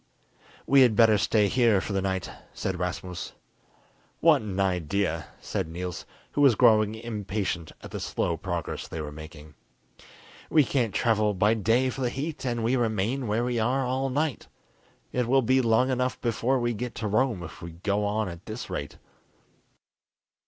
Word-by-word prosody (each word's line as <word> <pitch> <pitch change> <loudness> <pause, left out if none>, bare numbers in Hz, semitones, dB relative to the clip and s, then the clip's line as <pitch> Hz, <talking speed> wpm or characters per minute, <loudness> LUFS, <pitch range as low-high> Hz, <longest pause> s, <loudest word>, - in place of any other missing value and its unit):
"We 140 0 +6
had 120 -4 +5
better 110 -2 +5
stay 105 0 +3
here 115 -2 +3
for 100 - -4
the 95 - +1
night," 95 -1 -2 0.3
said 95 -2 -3
Rasmus. 90 0 -4 0.9
"What 155 -5 +5
an 100 -3 -5
idea!" 90 -3 0
said - - -3
Niels, 90 +2 -6 0.2
who 145 - 0
was 135 -5 +6
growing 110 -2 +4
impatient 105 -6 -3
at - - -9
the - - -4
slow - - -1
progress - - -4
they 80 - -6
were 75 -1 -5
making. 75 0 -11 1.0
"We 155 - +5
can't 125 -5 -1
travel 110 -3 +2
by 105 +4 +3
day 115 +4 +2
for 135 - -6
the 125 - +1
heat, 140 +1 -4
and 120 -2 -1
we 120 +3 +2
remain 115 +2 0
where 110 +3 +1
we 120 -1 -1
are 130 +4 +1
all 130 +2 -1
night. 145 +1 -1 0.6
It 125 -2 0
will 135 +1 +4
be 130 +3 +3
long 120 +2 +3
enough 125 0 -1
before 120 +3 0
we 120 0 0
get 120 +2 -5
to 110 - -3
Rome 110 -3 +1
if 80 - -10
we 85 - -6
go 100 +4 -1
on 105 +1 0
at 85 0 -9
this 110 +3 -6
rate." 75 0 -5
110 Hz, 175 wpm, -27 LUFS, 95-125 Hz, 1.0 s, We